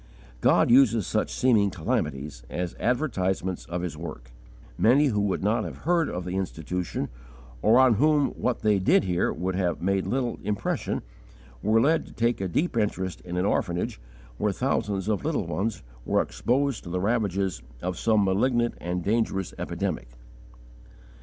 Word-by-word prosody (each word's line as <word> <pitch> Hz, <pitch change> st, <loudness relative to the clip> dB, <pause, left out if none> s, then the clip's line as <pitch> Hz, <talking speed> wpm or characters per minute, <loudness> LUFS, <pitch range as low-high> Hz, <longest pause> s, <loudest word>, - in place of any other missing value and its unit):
God -, -, +4 dB
uses 115 Hz, -5 st, +5 dB
such -, -, 0 dB
seeming 110 Hz, -6 st, +3 dB
calamities 75 Hz, -6 st, -2 dB
as 90 Hz, -1 st, -3 dB
'advertisements' 95 Hz, -, -1 dB
of 85 Hz, 0 st, -3 dB
His 85 Hz, -5 st, -4 dB
work; 75 Hz, -7 st, -8 dB, 0.4 s
many 135 Hz, -, +4 dB
who 105 Hz, -4 st, 0 dB
would 100 Hz, -2 st, -1 dB
not 105 Hz, +3 st, +2 dB
have -, -, -6 dB
heard 170 Hz, -1 st, +2 dB
of 90 Hz, 0 st, -4 dB
the 90 Hz, +1 st, -3 dB
Institution, 90 Hz, -1 st, -3 dB, 0.5 s
or 110 Hz, +3 st, +5 dB
on 130 Hz, -2 st, +6 dB
whom 150 Hz, +2 st, +3 dB
what 125 Hz, -1 st, -2 dB
they 105 Hz, -2 st, +3 dB
did 95 Hz, -, +4 dB
hear 90 Hz, -2 st, +1 dB
would 95 Hz, +1 st, -2 dB
have 90 Hz, -2 st, 0 dB
made 95 Hz, +1 st, 0 dB
little 125 Hz, -2 st, -1 dB
impression, 105 Hz, -1 st, -2 dB, 0.6 s
were 110 Hz, +2 st, +3 dB
led 155 Hz, +7 st, +2 dB
to -, -, -13 dB
take 115 Hz, -2 st, 0 dB
a 95 Hz, -, 0 dB
deep 145 Hz, -, 0 dB
interest 95 Hz, -5 st, -1 dB
in 90 Hz, 0 st, -5 dB
an 90 Hz, -, +1 dB
orphanage 85 Hz, -10 st, -1 dB, 0.4 s
where 105 Hz, -, +1 dB
thousands 105 Hz, -3 st, -1 dB
of 110 Hz, +2 st, 0 dB
little 150 Hz, -, -1 dB
ones 100 Hz, +6 st, -2 dB, 0.2 s
were -, -, +2 dB
exposed 135 Hz, 0 st, -1 dB
to -, -, -6 dB
the 90 Hz, +1 st, -1 dB
ravages 100 Hz, -, 0 dB, 0.2 s
of 90 Hz, 0 st, -3 dB
some 110 Hz, -2 st, +3 dB
malignant 120 Hz, +5 st, +2 dB
and 90 Hz, +1 st, -2 dB
dangerous 100 Hz, -3 st, 0 dB
epidemic. -, -, -3 dB
100 Hz, 160 wpm, -26 LUFS, 90-120 Hz, 0.6 s, on